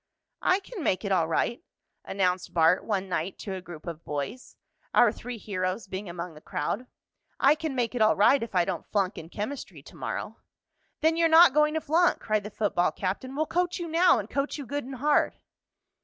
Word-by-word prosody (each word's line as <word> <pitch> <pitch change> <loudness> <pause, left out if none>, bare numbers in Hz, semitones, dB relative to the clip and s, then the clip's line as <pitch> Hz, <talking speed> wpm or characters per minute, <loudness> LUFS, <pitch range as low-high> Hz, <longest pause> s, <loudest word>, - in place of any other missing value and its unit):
"I 370 +2 +3
can 395 -3 -8
make 190 -3 0
it 200 - -2
all 170 -4 +3
right," 235 - 0 0.4
announced 185 -2 -1
Bart 165 +2 +4
one 195 -3 -2
night 180 0 -3
to 195 - -6
a 190 - -5
group 175 -4 -11
of 165 -1 -7
boys, 150 - -5 0.4
our 240 -3 +6
three 245 +1 -7
heroes 185 -1 -3
being 190 0 -6
among 170 0 -6
the 150 - -14
crowd. 200 +14 -3 0.5
"I 275 +2 +6
can 310 -2 -4
make 240 -2 0
it 245 - -2
all 215 - +5
right 265 +7 +5
if 230 -4 -6
I 175 -1 +4
don't - - -4
flunk 195 -2 0
in 160 - -10
chemistry 215 +9 -6
to - - -14
morrow." - - -5 0.6
"Then 320 +1 +3
you're 335 -1 +4
not 325 -3 +8
going 300 +1 +3
to 315 - 0
flunk!" 335 +4 +3
cried 215 -1 0
the 210 - -6
football 200 -4 +1
captain. 205 +8 -4
"We'll 310 +2 +1
coach 355 +2 0
you 345 -2 -4
now, 335 0 +4
and 210 -2 -4
coach 275 +6 -2
you 285 - -6
good 285 +2 -4
and 265 +1 -7
hard." 290 +4 +2
215 Hz, 210 wpm, -27 LUFS, 185-290 Hz, 0.6 s, not